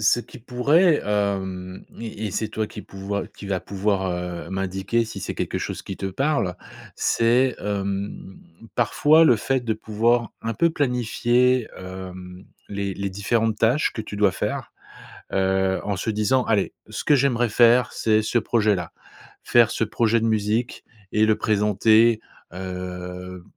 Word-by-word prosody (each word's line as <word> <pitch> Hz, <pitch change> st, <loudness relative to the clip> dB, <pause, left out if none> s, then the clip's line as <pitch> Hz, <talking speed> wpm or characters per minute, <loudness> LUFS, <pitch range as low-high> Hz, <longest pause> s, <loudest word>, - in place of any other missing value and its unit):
ce 120 Hz, +3 st, +4 dB
qui 130 Hz, -, -13 dB
pourrait, 145 Hz, +8 st, +3 dB
hem, 95 Hz, -3 st, -2 dB
et 110 Hz, -1 st, -5 dB
et -, -, -4 dB
c'est 110 Hz, +3 st, -2 dB
toi 110 Hz, 0 st, -2 dB
qui -, -, -9 dB
pouvoi 100 Hz, +1 st, -5 dB
qui 100 Hz, -, -12 dB
va 95 Hz, -2 st, 0 dB
pouvoir, 95 Hz, -1 st, -1 dB
heu, 90 Hz, -1 st, -5 dB
m'indiquer 95 Hz, +4 st, -1 dB
si 110 Hz, -3 st, -8 dB
c'est -, -, -4 dB
quelque -, -, -2 dB
chose -, -, -5 dB
qui 95 Hz, -, -7 dB
te 95 Hz, -, -4 dB
parle, 115 Hz, -, 0 dB, 0.4 s
c'est, 125 Hz, +3 st, +2 dB
hem, 100 Hz, -1 st, -4 dB, 0.4 s
parfois 150 Hz, +7 st, +4 dB
le 120 Hz, -7 st, +5 dB
fait 130 Hz, +4 st, 0 dB
de 115 Hz, -2 st, -1 dB
pouvoir 115 Hz, +2 st, +1 dB
un 115 Hz, 0 st, -2 dB
peu 170 Hz, -1 st, +3 dB
planifier, 125 Hz, -2 st, +1 dB
hem, 95 Hz, 0 st, -9 dB, 0.2 s
les 100 Hz, -1 st, -3 dB
les 100 Hz, 0 st, -3 dB
différentes 110 Hz, +3 st, 0 dB
tâches 120 Hz, +7 st, +2 dB
que 110 Hz, -, -5 dB
tu 105 Hz, -, -8 dB
dois 100 Hz, -2 st, +4 dB
faire, -, -, -3 dB, 0.6 s
heu, 95 Hz, 0 st, +1 dB
en 100 Hz, -2 st, -2 dB
se 105 Hz, -, -3 dB
disant: 110 Hz, +5 st, +2 dB
«Allez, 105 Hz, -3 st, +1 dB, 0.2 s
ce -, -, -5 dB
que 150 Hz, -, +4 dB
j'aimerais 120 Hz, -3 st, +2 dB
faire 120 Hz, +1 st, +5 dB
c'est 110 Hz, -1 st, +2 dB
ce 120 Hz, +2 st, +1 dB
projet 110 Hz, -2 st, +2 dB
là, 90 Hz, -3 st, -5 dB, 0.5 s
faire 120 Hz, -2 st, +5 dB
ce -, -, 0 dB
projet 115 Hz, +1 st, +1 dB
de -, -, 0 dB
musique 110 Hz, +2 st, 0 dB, 0.3 s
et 110 Hz, 0 st, +3 dB
le 110 Hz, -1 st, +3 dB
présenter» 110 Hz, +2 st, +3 dB, 0.3 s
heu, 90 Hz, -1 st, -6 dB
105 Hz, 160 wpm, -23 LUFS, 95-120 Hz, 0.6 s, le